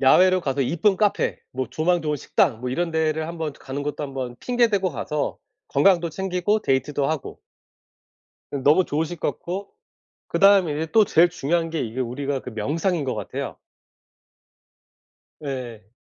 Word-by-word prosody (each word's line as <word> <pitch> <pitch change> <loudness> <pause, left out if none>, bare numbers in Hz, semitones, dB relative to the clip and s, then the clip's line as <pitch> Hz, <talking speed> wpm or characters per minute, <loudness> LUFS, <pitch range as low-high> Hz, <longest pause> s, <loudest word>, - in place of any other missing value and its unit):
야외로 185 +7 +5
가서 140 -4 -1
이쁜 175 - +2
카페 210 0 +1
뭐 130 0 -2
조망 165 +7 +1
좋은 150 -1 -1
식당 135 - +1
뭐 125 0 -3
이런 170 +6 -1
데를 160 -1 0
한번 160 -3 -4
가는 135 +1 -6
것도 150 +1 -3
한번 130 -3 -5
핑계 245 -1 +2
대고 195 -3 +1
가서 150 +2 -3 0.3
건강도 170 +4 +3
챙기고 190 +4 0
데이트도 135 +1 0
하고. 155 -3 -4 1.1
응 135 - -3
너무 150 +7 +5
좋으실 160 +3 -2
것 - - 0
같고 195 +3 -6 0.6
그 - - -1
다음에 195 -5 +6
이제 155 +2 -2
또 220 -1 +6
제일 175 -2 +5
중요한 165 0 -1
게 160 -1 -2
이게 120 +1 -3
우리가 135 +3 -2
그 125 - -8
명상인 155 - -1
것 130 - -1
같아요. 105 -3 -5 1.9
네. 125 -8 -6
155 Hz, 310 characters per minute, -23 LUFS, 135-180 Hz, 1.9 s, 다음에